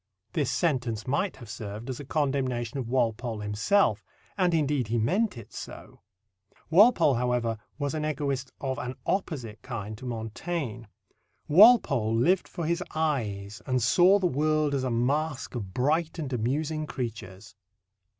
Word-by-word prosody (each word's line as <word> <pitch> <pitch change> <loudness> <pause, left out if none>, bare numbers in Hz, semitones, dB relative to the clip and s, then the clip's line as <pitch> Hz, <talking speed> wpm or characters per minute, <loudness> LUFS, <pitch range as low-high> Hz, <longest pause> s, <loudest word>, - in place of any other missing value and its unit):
This 145 -5 0
sentence 125 -9 0
might 145 +9 0
have 120 - -12
served 105 +2 -7
as 130 -2 -4
a - - -6
condemnation 135 -4 -1
of 120 -3 -4
Walpole 120 -2 0
himself, 105 - +2 0.3
and 180 -2 +2
indeed 145 -6 +1
he 115 +2 0
meant 185 - +1
it 115 - -11
so. - - -9 0.7
Walpole, 180 - +6
however, 120 -2 0 0.2
was 145 -1 -2
an 155 -1 -2
egoist 140 -3 -2
of 130 -1 -3
an 125 +1 -4
opposite 135 - -2
kind 110 -4 -6
to 130 - -7
Montaigne. 120 +2 -4 0.6
Walpole 150 - +6
lived 175 +11 +2
for 170 - -5
his 170 +3 0
eyes, 110 -10 -2
and 130 -1 +1
saw 175 - +5
the 195 - -1
world 155 -1 +1
as 135 -2 0
a 130 - 0
masque 135 +5 -1
of 105 -7 -5
bright 155 - 0
and 145 -5 -4
amusing 150 +6 -1
creatures. 100 -8 -6
130 Hz, 150 wpm, -27 LUFS, 115-155 Hz, 0.7 s, Walpole